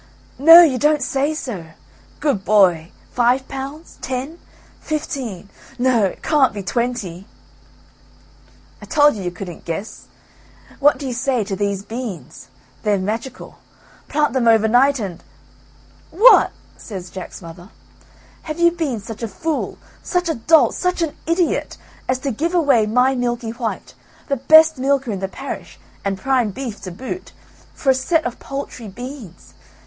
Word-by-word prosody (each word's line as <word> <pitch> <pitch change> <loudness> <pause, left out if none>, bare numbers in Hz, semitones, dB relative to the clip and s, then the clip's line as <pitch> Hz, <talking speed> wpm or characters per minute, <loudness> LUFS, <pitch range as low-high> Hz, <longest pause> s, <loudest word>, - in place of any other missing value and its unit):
"No, 330 +5 +10
you 265 -7 +2
don't 300 +1 +2
say 285 +3 0
so. 235 - -5 0.6
Good 280 -10 0
boy! 180 -6 +3 0.2
Five 250 +2 +2
pounds, 275 +4 -8
ten, 270 +6 -4 0.4
fifteen, 260 - -4 0.3
no, 245 -4 +3
it 190 - -5
can't 275 -8 +3
be 200 - -5
twenty." 205 -5 -3 1.5
"I - - -9
told 295 -1 +4
you 205 - -6
you 180 - -2
couldn't 175 -1 -9
guess, 175 +6 -6 0.7
what 290 +1 +4
do 285 - -7
you 255 - -3
say 255 -1 0
to 200 -1 -4
these 200 0 -2
beans; 220 - -7 0.3
they're 210 -1 +1
magical, 225 +7 -5 0.5
plant 295 -4 0
them 255 -3 +1
over 220 -1 +5
night 265 +5 +4
and 190 -6 -6 0.5
" - - -29
"What!" 455 +8 +6 0.3
says 185 -5 -8
Jack's 185 - -8
mother, 170 +3 -11 0.7
"have 310 +1 -6
you 340 0 +5
been 310 -9 -2
such 220 +2 -9
a 230 - -2
fool, 315 - -3 0.2
such 360 -1 -1
a - - +1
dolt, 315 +7 +4
such 360 -1 -1
an 315 - -3
idiot, 335 +1 0 0.3
as 255 - +2
to 275 - +1
give 330 +10 -2
away 275 -10 +3
my 250 +4 +3
Milky 240 -2 -2
white, 230 -1 -5 0.4
the 275 - +1
best 315 +3 +6
milker 270 -2 +1
in 195 - -3
the 195 - -2
parish, 270 +8 -8 0.2
and 195 -1 -1
prime 255 +1 +1
beef 230 0 -6
to 185 - -7
boot, 260 - -7 0.4
for 270 - +2
a - - +4
set 315 +5 0
of 245 - -4
paltry 275 -4 -6
beans. 245 - -10
250 Hz, 155 wpm, -20 LUFS, 205-290 Hz, 1.5 s, No